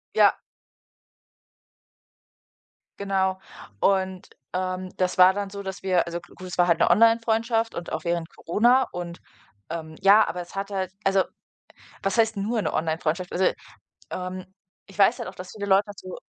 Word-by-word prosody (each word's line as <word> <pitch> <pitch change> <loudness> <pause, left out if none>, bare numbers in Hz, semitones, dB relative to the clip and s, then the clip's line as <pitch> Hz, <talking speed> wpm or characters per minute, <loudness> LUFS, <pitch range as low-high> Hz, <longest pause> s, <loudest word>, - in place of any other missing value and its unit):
Ja. - - +6 2.6
Genau. 190 -1 0 0.4
Und, 190 - 0 0.2
ähm, 185 0 -2
das 185 -1 0
war 185 +1 +8
dann 200 0 -3
so, 200 0 -7
dass 190 0 -7
wir 185 -2 +2
also, 170 0 -4
g - - -18
gut, 185 - -9
es 180 - -7
war 175 -1 +4
halt 170 -1 +3
'ne - - +4
Onlinefreundschaft 225 +2 +3
und 170 - -6
auch 155 0 -3
während 170 -1 -1
Corona 240 +9 +3
und, 175 -1 -6 0.5
ähm 160 -1 -6
ja, 205 +2 +7
aber 180 - -4
es 175 - -12
hat 195 +1 -3
halt 190 -2 -2
also, 195 -1 +3 0.8
was 195 +4 -1
heißt 225 -1 +2
nur 215 +3 -1
'ne 160 - -2
Online-Freundschaft? 165 +2 -1
Also, 185 +1 +1 0.7
ähm, 185 0 -5 0.4
ich 195 - -16
weiß 200 -1 +4
halt - - -5
auch, 185 - -13
dass 185 0 -9
viele 205 -2 -5
Leute 195 0 +4
dazu 185 -2 -9
190 Hz, 165 wpm, -25 LUFS, 175-200 Hz, 2.6 s, war